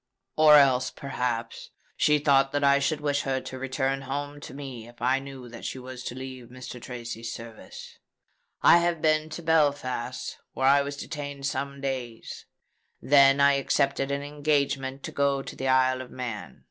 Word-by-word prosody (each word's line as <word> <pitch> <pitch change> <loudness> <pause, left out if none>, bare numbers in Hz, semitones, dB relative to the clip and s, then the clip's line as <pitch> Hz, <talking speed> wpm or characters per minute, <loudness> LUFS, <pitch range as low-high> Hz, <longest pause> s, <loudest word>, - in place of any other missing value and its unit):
Or 155 -1 +7
else, 130 -3 +5
perhaps, 120 -4 -4 0.3
she 150 0 +3
thought 135 -2 +3
that 145 0 0
I 140 0 +5
should 150 +2 -1
wish 145 -1 0
her 135 -1 -1
to 130 0 -8
return 135 +1 -1
home 145 +2 -5
to 140 - -10
me 130 -5 -8
if 120 0 -16
I 130 +2 +2
knew 135 -2 -9
that 115 0 -10
she - - -4
was 130 0 -8
to 120 - -5
leave 130 -2 -8
Mr. 125 0 -9
Tracy's 120 -2 -6
service. 115 -1 -10 0.6
I 170 - +8
have 170 -1 0
been 155 0 +2
to 170 +2 -7
Belfast 145 -6 0
where 130 - -1
I 140 +1 +6
was 140 0 -5
detained 145 -2 -6
some 140 0 -3
days: 130 -4 -5 0.5
then 140 0 +5
I 140 0 +6
accepted 135 0 0
an 140 0 -2
engagement 140 -2 -1
to - - -5
go 140 -1 +1
to - - -8
the 135 - -3
Isle 130 0 +3
of 130 - -9
Man. 120 -5 -6
135 Hz, 175 wpm, -27 LUFS, 130-145 Hz, 0.6 s, I